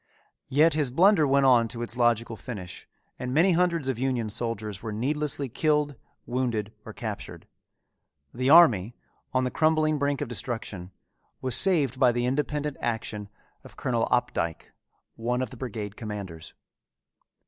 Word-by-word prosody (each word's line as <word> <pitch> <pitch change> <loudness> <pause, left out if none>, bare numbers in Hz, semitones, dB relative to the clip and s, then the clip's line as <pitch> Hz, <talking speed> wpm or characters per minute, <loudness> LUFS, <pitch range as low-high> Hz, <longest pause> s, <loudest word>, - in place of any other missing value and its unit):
Yet 155 +5 +4
his 150 -3 +1
blunder 170 +3 +4
went 140 0 +3
on 120 -3 +5
to 120 +1 -6
its 120 - -4
logical 115 -1 +1
finish 100 -7 -8 0.3
and 125 0 -4
many 165 +8 +4
hundreds 170 -4 +1
of 130 -3 -2
Union 125 -4 -1
soldiers 110 -3 -3
were 110 - -5
needlessly 140 +5 -1
killed, 150 +3 0 0.3
wounded, 120 -4 -2
or - - -9
captured; - - -7 0.9
the 130 +2 -1
army, 120 - +6 0.4
on 130 0 +1
the 125 - -1
crumbling 155 -1 +2
brink 140 0 0
of 145 - -3
destruction, 110 -6 -5 0.5
was 130 -1 0
saved 145 -7 +4
by 125 -2 +5
the 120 0 -1
independent 150 +2 -2
action 110 -3 -4 0.3
of - - -15
Colonel 120 -3 0
Opdycke, 105 -10 -1 0.5
one 120 +2 -1
of 125 - -6
the - - -9
brigade 105 -5 -5
commanders. 100 -8 -7
125 Hz, 150 wpm, -26 LUFS, 115-145 Hz, 0.9 s, army